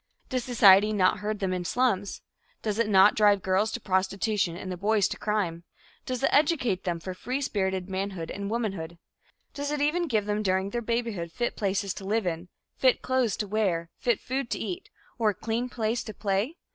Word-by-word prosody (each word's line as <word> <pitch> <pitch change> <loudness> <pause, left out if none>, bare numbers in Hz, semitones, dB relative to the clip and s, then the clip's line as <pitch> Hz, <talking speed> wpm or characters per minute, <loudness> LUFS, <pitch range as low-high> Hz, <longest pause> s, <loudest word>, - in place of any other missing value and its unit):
Does 255 -2 -1
society 210 -4 +6
not 185 -3 +3
herd 210 +1 -2
them 190 -2 -1
in 180 -1 -2
slums? 205 -1 0 0.4
Does 215 0 -1
it 230 -2 +2
not 195 0 +6
drive 205 -2 +4
the - - -14
girls 190 +3 +2
to - - -3
prostitution 190 -2 0
and 185 0 -6
the - - -3
boys 205 +2 +2
to - - -3
crime? 190 -6 -2 0.4
Does 255 0 -3
it - - +3
educate 275 - +2
them 170 -2 -1
for 185 +3 -6
free 250 +8 -3
spirited 190 -8 -1
manhood 190 -3 -4
and 200 0 -4
womanhood? 195 -8 -3 0.6
Does 285 0 -3
it 295 0 -1
even 325 +4 +1
give 215 -7 +1
them 210 0 -1
during 190 0 0
their 240 - -2
babyhood 230 -7 -2
fit 240 +8 -2
places 195 -2 -1
to 195 - -9
live 210 +2 0
in, 175 +1 -3 0.3
fit 255 -2 +2
clothes 255 -4 +1
to 210 - -2
wear, 190 -6 0
fit 240 -3 +1
food 260 -1 -3
to - - -1
eat, 370 +1 -5 0.3
or 220 -2 +3
a 205 - -2
clean 230 +4 -2
place 230 0 -1
to 215 - -7
play? 205 - -1
210 Hz, 205 wpm, -27 LUFS, 190-235 Hz, 0.6 s, society